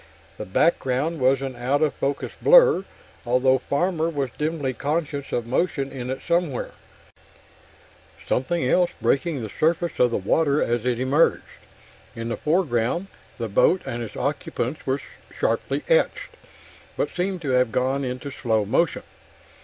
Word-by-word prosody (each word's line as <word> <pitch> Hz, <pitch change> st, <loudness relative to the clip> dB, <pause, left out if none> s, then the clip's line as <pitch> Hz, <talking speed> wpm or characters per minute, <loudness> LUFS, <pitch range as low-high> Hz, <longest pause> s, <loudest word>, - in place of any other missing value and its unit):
The -, -, -5 dB
background 145 Hz, -, +1 dB
was 135 Hz, +1 st, +3 dB
an 135 Hz, -2 st, -4 dB
out 130 Hz, +5 st, 0 dB
of 150 Hz, -, +1 dB
focus 140 Hz, +1 st, -2 dB
blur, -, -, +6 dB, 0.4 s
although 125 Hz, +2 st, +3 dB
Farmer 165 Hz, +3 st, 0 dB
was 140 Hz, -6 st, -2 dB
dimly 150 Hz, -3 st, -2 dB
conscious 145 Hz, +1 st, -3 dB
of 120 Hz, -, -1 dB
motion 135 Hz, +2 st, -1 dB
in 125 Hz, -2 st, -6 dB
it 130 Hz, -, -4 dB
somewhere 170 Hz, -6 st, 0 dB, 1.5 s
something 135 Hz, +4 st, 0 dB
else 180 Hz, +5 st, +3 dB
breaking 140 Hz, -2 st, 0 dB
the 110 Hz, -, -6 dB
surface 165 Hz, +2 st, +1 dB
of 125 Hz, -, +5 dB
the 115 Hz, -, -1 dB
water 140 Hz, +9 st, +2 dB
as 120 Hz, 0 st, 0 dB
it 120 Hz, -1 st, 0 dB
emerged. 135 Hz, +5 st, +2 dB, 0.7 s
In 115 Hz, 0 st, -4 dB
the 120 Hz, -, -1 dB
foreground, 155 Hz, +1 st, 0 dB, 0.3 s
the 115 Hz, -, -3 dB
boat 175 Hz, -, +3 dB
and 120 Hz, -, -4 dB
its 115 Hz, -, -7 dB
occupants 135 Hz, +6 st, -3 dB
were 135 Hz, +1 st, +1 dB, 0.4 s
sharply -, -, 0 dB
etched, -, -, +1 dB, 0.6 s
but -, -, -1 dB
seemed 180 Hz, -1 st, -2 dB
to 140 Hz, -, -1 dB
have 125 Hz, -2 st, +3 dB
gone 130 Hz, +3 st, 0 dB
into 130 Hz, +2 st, -4 dB
slow 115 Hz, -5 st, 0 dB
motion. 145 Hz, +10 st, +1 dB
135 Hz, 145 wpm, -24 LUFS, 125-165 Hz, 1.5 s, blur